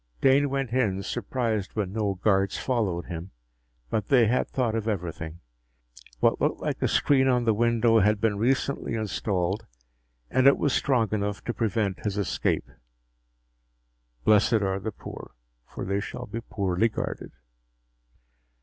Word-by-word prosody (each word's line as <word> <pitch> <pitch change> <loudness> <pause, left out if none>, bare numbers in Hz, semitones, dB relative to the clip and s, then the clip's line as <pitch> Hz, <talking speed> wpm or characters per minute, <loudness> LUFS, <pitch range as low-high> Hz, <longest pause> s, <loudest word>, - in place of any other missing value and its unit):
Dane 140 - +4
went 135 -3 -2
in, 100 -7 +1
surprised 115 -4 -2
when 100 -3 -2
no 105 -3 0
guards 95 0 +1
followed 100 -9 -1
him. 85 +1 -6 0.6
But 105 -3 -1
they 125 -4 +5
had 125 +4 +1
thought 120 -4 -1
of 115 -1 -2
everything. 85 -5 -4 0.8
What - - +2
looked - - +1
like - - -3
a - - +2
screen 135 -2 +3
on 125 -2 +3
the 110 - +4
window 115 0 +3
had 105 0 +3
been 105 -2 0
recently 130 +1 0
installed 100 -3 -2 0.6
and 130 +1 +4
it 140 - +6
was 145 - +1
strong 120 -6 +2
enough 105 -1 -2
to 120 - -3
prevent 105 -4 -1
his 105 -1 -2
escape. 100 - 0 1.6
Blessed 105 - +4
are 95 0 0
the 110 +3 -4
poor, - - -10 0.3
for - - -6
they 100 +1 0
shall 100 - -6
be 115 +3 -5
poorly 100 -1 0
guarded! - - -5
110 Hz, 150 wpm, -26 LUFS, 100-120 Hz, 1.6 s, it